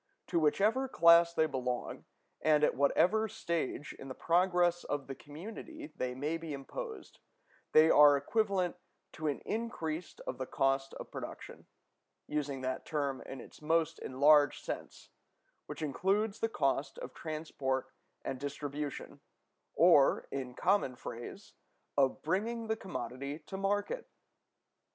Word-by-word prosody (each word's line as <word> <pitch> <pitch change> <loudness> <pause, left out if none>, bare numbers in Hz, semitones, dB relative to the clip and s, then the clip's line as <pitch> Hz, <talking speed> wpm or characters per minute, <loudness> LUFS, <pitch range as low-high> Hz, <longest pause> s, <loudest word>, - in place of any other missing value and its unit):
To 170 - +2
whichever 210 - +2
class 170 -6 +6
they 160 -2 +2
belong, 125 -4 -3 0.4
and 150 -1 +4
at - - +4
whatever 185 +10 +3
stage 165 -7 -3
in 135 - -8
the 130 - -6
progress 175 0 +2
of 145 -2 -3
the 135 - -6
community 225 - -9
they 125 0 -2
may 150 +5 -1
be 165 -2 -5
imposed, 440 - -7 0.5
they 155 +1 +7
are 145 -1 +8
equivalent 190 +3 0 0.3
to 155 - -4
an 145 - -1
increase 180 -8 -4
of - - -4
the 130 - -3
cost 135 0 0
of - - -9
production; - - -8 0.6
using 145 -3 -2
that 130 0 -2
term 140 -3 -2
in 135 - -7
its - - -13
most 160 +1 +1
enlarged 145 +2 +4
sense, - - -6 0.6
which - - -6
includes 195 +9 0
the 225 - 0
cost 140 -6 0
of - - -7
transport 150 -4 -3 0.3
and 135 -1 -3
distribution, 145 +1 -5 0.6
or, - - +5
in 130 -2 -4
common 185 -9 +2
phrase, 120 - -8 0.4
of 135 -2 +2
bringing 225 +8 -1
the 220 0 0
commodity 140 - -5
to - - -7
market. 205 - -1
155 Hz, 135 wpm, -33 LUFS, 140-190 Hz, 0.6 s, are